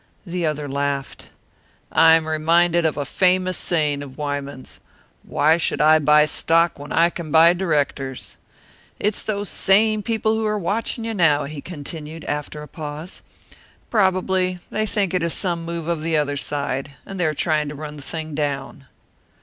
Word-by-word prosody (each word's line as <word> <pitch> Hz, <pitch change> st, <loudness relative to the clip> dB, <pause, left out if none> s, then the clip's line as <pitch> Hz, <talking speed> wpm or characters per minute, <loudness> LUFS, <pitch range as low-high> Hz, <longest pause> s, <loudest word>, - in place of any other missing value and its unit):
The 175 Hz, -2 st, -2 dB
other 150 Hz, -1 st, -2 dB
laughed. 140 Hz, 0 st, -3 dB, 0.6 s
"I 160 Hz, 0 st, +6 dB
am 160 Hz, -1 st, 0 dB
reminded 165 Hz, +2 st, +3 dB
of 155 Hz, -, -3 dB
a 145 Hz, -, -2 dB
famous 185 Hz, +1 st, +2 dB
saying 150 Hz, -5 st, 0 dB
of 135 Hz, -2 st, -10 dB
Wyman's, 145 Hz, -2 st, -5 dB, 0.4 s
'Why 155 Hz, +3 st, +2 dB
should 170 Hz, -, -1 dB
I 155 Hz, +1 st, +6 dB
buy 150 Hz, 0 st, +5 dB
stock 165 Hz, +2 st, +2 dB
when 145 Hz, +1 st, -9 dB
I 170 Hz, +1 st, +4 dB
can 170 Hz, -3 st, -7 dB
buy 165 Hz, +3 st, +6 dB
directors?'" 145 Hz, -7 st, -2 dB, 0.6 s
"It's 210 Hz, 0 st, 0 dB
those 205 Hz, -1 st, -3 dB
same 215 Hz, +4 st, +3 dB
people 220 Hz, 0 st, 0 dB
who 220 Hz, 0 st, -1 dB
are 210 Hz, 0 st, 0 dB
watching 225 Hz, +4 st, -2 dB
you 225 Hz, -, -2 dB
now," 160 Hz, -7 st, +3 dB
he 145 Hz, 0 st, -6 dB
continued, 155 Hz, 0 st, -8 dB
after 150 Hz, +1 st, -4 dB
a -, -, -10 dB
pause. 155 Hz, +3 st, -7 dB, 0.7 s
"Probably 185 Hz, -3 st, +1 dB
they 215 Hz, 0 st, -1 dB
think 200 Hz, -3 st, -1 dB
it 180 Hz, -, +1 dB
is 170 Hz, 0 st, -1 dB
some 170 Hz, -3 st, -2 dB
move 170 Hz, -1 st, -5 dB
of 170 Hz, -2 st, -1 dB
the 160 Hz, 0 st, +1 dB
other 145 Hz, -1 st, 0 dB
side, 140 Hz, -1 st, -3 dB
and 195 Hz, -1 st, -7 dB
they 175 Hz, -, +2 dB
are 155 Hz, -, -1 dB
trying 150 Hz, -1 st, 0 dB
to 150 Hz, -, -7 dB
run 150 Hz, 0 st, -7 dB
the -, -, -9 dB
thing 155 Hz, +2 st, -5 dB
down." 140 Hz, -2 st, -3 dB
160 Hz, 175 wpm, -22 LUFS, 145-180 Hz, 0.7 s, I